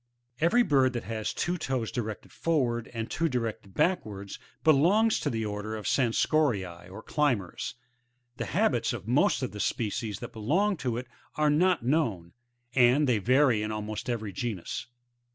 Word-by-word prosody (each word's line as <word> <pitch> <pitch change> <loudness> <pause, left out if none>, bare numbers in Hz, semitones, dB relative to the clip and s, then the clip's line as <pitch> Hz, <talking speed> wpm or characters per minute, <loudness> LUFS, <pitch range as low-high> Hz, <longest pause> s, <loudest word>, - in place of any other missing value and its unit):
Every 220 +10 +4
bird 135 - +3
that 120 - -3
has 110 +1 -3
two 175 0 -2
toes 130 -6 -2
directed 110 -3 -5
forward, 125 -8 0
and 115 -1 -4
two 165 0 0 0.4
backwards, 105 - -1 0.2
belongs 180 +9 +4
to - - -1
the 110 -1 -2
order 105 +1 -4
of 110 - -7
Scansoriae, 115 - +1
or 100 +4 -10
Climbers. 125 - -1 0.6
The - - -3
habits - - +1
of - - -7
most - - +3
of - - -2
the 105 - -8
species 105 -1 -2
that - - -8
belong 175 - +1
to 120 -5 -2
it 125 - -4 0.3
are 150 -1 +3
not 170 -3 +2
known; 115 - 0 0.4
and 130 +4 +5
they 120 -4 +3
vary 125 +1 +3
in 105 0 -2
almost 110 +2 -4
every 110 -4 -2
genus. 110 -1 -4
120 Hz, 155 wpm, -28 LUFS, 105-150 Hz, 0.6 s, and